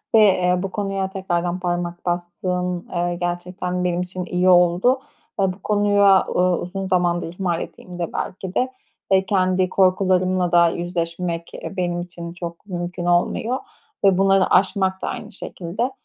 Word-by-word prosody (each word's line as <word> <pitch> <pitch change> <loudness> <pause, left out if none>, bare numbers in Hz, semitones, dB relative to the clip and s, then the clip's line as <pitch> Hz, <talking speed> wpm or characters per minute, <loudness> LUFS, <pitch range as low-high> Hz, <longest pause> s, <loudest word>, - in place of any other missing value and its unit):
ve, - - +8
eee, 185 -4 +4
bu 195 - -3
konuya 195 -2 -2
tekrardan 180 -2 -2
parmak 175 -1 -3
bastığın, 180 0 -2
eee, 175 0 0
gerçekten 180 +1 -3
benim 180 0 0
için 180 0 -5
iyi 180 +1 +1
oldu. 180 +8 +4 0.4
Ve 190 -2 +2
bu 185 - -16
konuya, 205 -2 +4
uuu, 180 -1 +2
uzun 190 +2 -4
zamandır 175 -2 +1
ihmal 175 -2 -1
ettiğimde 175 -2 -6
belki 185 0 -4
de 255 +1 +1 0.4
ve 190 0 +4
kendi 185 -1 +2
korkularımla 185 -1 +2
da 170 -1 +6
yüzleşmek, 170 0 -3
eee, - - -7
benim 175 -1 -1
için 170 -1 -8
çok 170 0 -7
mümkün 175 -1 -4
olmuyor 175 +8 +1 0.5
ve 195 -2 +5
bunları 195 0 +4
aşmak 190 -1 +2
da - - -3
aynı - - -5
şekilde. 195 +7 -4
180 Hz, 150 wpm, -22 LUFS, 175-190 Hz, 0.5 s, ve